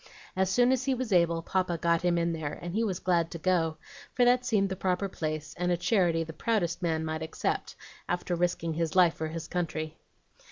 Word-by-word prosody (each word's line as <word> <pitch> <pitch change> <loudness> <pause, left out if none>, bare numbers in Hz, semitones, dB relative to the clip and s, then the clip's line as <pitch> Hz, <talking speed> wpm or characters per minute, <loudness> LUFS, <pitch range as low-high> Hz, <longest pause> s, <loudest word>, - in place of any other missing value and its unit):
As 190 0 +1
soon 245 +5 +4
as 260 0 +1
he 270 -1 +2
was 250 -4 -2
able, 170 -2 +3
Papa 185 -2 0
got 170 0 +2
him 175 -1 +2
in 170 0 +1
there, 155 -2 -4
and 175 0 -6
he 225 +3 +1
was 195 -5 -1
glad 170 -3 +1
to 170 - -6
go, 165 -2 +1 0.4
for 245 - +4
that 250 +1 +4
seemed 210 -6 +1
the 190 - -2
proper 185 +1 0
place, 155 -4 -4
and 180 0 +1
a 175 - +2
charity 175 -3 +2
the 160 0 -8
proudest 180 -5 -1
man 160 -2 0
might 160 0 -3
accept, 160 0 -2 0.3
after 175 0 -1
risking 175 -1 0
his 165 0 -2
life 180 -3 +6
for 160 - -4
his 160 0 -6
country. 160 -3 -3
175 Hz, 215 wpm, -29 LUFS, 165-190 Hz, 0.4 s, life